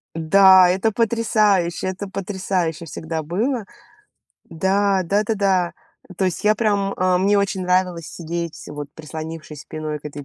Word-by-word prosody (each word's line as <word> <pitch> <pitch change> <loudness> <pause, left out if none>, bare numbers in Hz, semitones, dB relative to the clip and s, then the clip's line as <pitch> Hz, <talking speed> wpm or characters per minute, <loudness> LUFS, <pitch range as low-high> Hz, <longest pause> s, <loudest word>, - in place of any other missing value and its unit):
Да, 185 +3 +6
это 195 +5 +1
потрясающе, 210 -6 +1
это 190 +2 -4
потрясающе 185 -4 -3
всегда 160 0 -5
было. 220 - -1 0.8
Да, 195 +3 +1
да-да-да. 195 -2 +1 0.4
То 190 - 0
есть, 185 +2 -2
я 210 0 +5
прям, 205 -3 0
а, 185 0 +2
мне 200 +2 +3
очень 195 -1 -1
нравилось 180 -2 0
сидеть, 170 0 -5
вот 145 -1 -7
прислонившись 155 -1 -8
спиной 155 -1 -5
к 145 - -29
этой 145 -1 -7
185 Hz, 135 wpm, -21 LUFS, 165-200 Hz, 0.8 s, Да